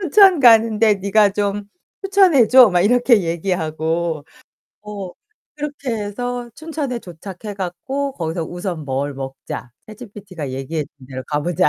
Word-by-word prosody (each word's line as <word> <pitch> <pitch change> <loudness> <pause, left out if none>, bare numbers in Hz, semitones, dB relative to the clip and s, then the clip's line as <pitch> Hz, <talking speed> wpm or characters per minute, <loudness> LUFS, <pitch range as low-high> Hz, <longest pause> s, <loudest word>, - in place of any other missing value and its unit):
춘천 380 -2 +5
가는데 225 -3 +5
네가 200 +1 +3
좀 205 0 -2 0.4
추천해 380 - +4
줘." 255 -3 +8
막 175 -1 +2
이렇게 235 0 +4
얘기하고 165 -2 -2 0.6
어 205 -3 -7 0.5
그렇게 290 -3 -5
해서 240 +3 -4
춘천에 300 -6 -4
도착해 190 +3 -9
갖고 265 +10 -3
거기서 165 -4 -3
"우선 175 -2 -5
뭘 140 +1 -2
먹자. 135 -2 -7 0.2
챗지피티가 200 - -9
얘기해 135 +4 -3
준 130 -2 -16
데로 130 -1 -7
가 145 -1 0
보자." 175 +3 +1
200 Hz, 290 characters per minute, -20 LUFS, 165-245 Hz, 0.6 s, 줘